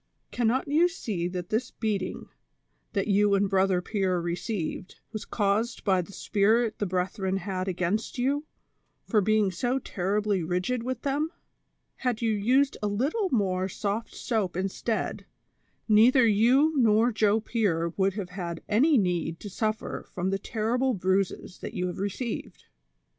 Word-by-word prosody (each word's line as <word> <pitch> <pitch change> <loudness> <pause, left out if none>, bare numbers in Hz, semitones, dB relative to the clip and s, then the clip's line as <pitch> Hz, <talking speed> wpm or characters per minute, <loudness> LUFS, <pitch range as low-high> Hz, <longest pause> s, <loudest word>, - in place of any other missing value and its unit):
Cannot 245 +3 +1
you 310 +5 +4
see 205 - -3
that 180 -1 -5
this 225 +4 0
beating, 205 -5 -3 0.7
that 200 -2 0
you 205 0 +4
and 200 0 +2
Brother 190 -2 +2
Pier 190 -4 0
received, 175 +1 -3 0.2
was 215 0 -5
caused 210 +2 0
by 190 -3 +3
the 180 - -10
spite 215 +3 +1
the 205 - 0
brethren 185 +1 -1
had 190 0 -3
against 185 +7 -1
you, 280 +5 0 0.6
for 215 -4 +2
being 215 -1 +2
so 245 +9 0
terribly 205 -3 -1
rigid 180 +9 -1
with 255 0 -4
them 285 +2 0
V 325 - -21 0.6
Had 250 -4 -1
you 225 - +2
used 250 +7 +2
a 210 - 0
little 280 - 0
more 190 -6 0
soft 205 +4 -3
soap 210 -8 -1
instead, 195 +4 -2 0.6
neither 235 +4 +6
you 245 +9 +4
nor 230 -1 +4
Joe 215 -1 +3
Pier 200 -7 0
would 195 -1 +1
have 200 -4 -4
had 170 -3 -5
any 275 +8 +4
need 175 -4 0
to 205 - -7
suffer 215 +2 -3
from 185 +1 -2
the 195 - 0
terrible 240 +5 0
bruises 190 0 -1
you 180 - -3
have 180 0 -4
received." 205 +4 -4
205 Hz, 150 wpm, -27 LUFS, 185-235 Hz, 0.7 s, neither